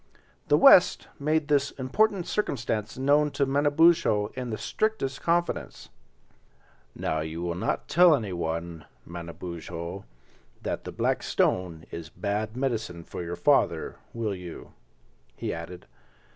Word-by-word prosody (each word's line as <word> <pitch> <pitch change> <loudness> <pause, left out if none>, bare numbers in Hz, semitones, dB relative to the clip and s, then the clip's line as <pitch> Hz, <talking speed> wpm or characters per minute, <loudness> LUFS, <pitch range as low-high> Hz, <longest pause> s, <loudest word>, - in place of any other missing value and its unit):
The - - +5
West - - +6
made 155 +1 +1
this 145 -1 +2
important 180 +8 0
circumstance 115 - -2
known 145 +3 +3
to 140 - +3
Manabozho 145 -5 +3
in 125 -1 -5
the 110 - -3
strictest 215 -12 -2
confidence. 170 +1 -1 1.1
"Now 80 - -1
you 80 +2 -4
will 85 -1 -1
not 90 - -2
tell 175 -1 +6
anyone, 85 - -4 0.2
Manabozho, 85 +1 -7 0.6
that - - -3
the - - -5
black - - 0
stone 85 -3 0
is 80 -1 -7
bad 105 +5 -3
medicine 110 -10 -2
for - - -7
your 85 +1 -4
father, - - +2
will 115 -3 -2
you?" 90 -3 -9 0.6
he - - -3
added. 85 +2 -8
110 Hz, 125 wpm, -27 LUFS, 85-145 Hz, 1.1 s, West